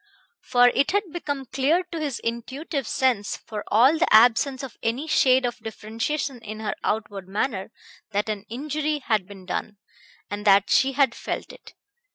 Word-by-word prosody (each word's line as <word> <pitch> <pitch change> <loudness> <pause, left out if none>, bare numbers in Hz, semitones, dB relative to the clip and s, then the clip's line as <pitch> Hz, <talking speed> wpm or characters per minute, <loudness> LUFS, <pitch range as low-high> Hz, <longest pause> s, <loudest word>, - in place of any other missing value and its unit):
For 245 0 +5
it 275 - +1
had 405 -5 0
become 285 -6 -4
clear 275 +8 +1
to 335 - -4
his 290 -5 -2
intuitive 260 +4 -4
sense, 245 -6 0
for 210 -2 -7
all 260 +9 +4
the 345 - +2
absence 245 +4 +5
of 265 - -7
any 235 +6 -1
shade 260 -4 +4
of 240 - -3
differentiation 230 +5 -3
in 215 0 -7
her 215 -2 -2
outward 205 -3 -2
manner, 200 0 -2 0.4
that 205 +1 0
an 210 -2 -4
injury 300 +4 -2
had 210 -5 +1
been 195 -2 -12
done, 205 +3 -4 0.5
and 205 0 -5
that 200 -1 +4
she 270 0 +4
had 270 -3 +3
felt - - -5
it. - - -15
245 Hz, 170 wpm, -24 LUFS, 215-280 Hz, 0.5 s, For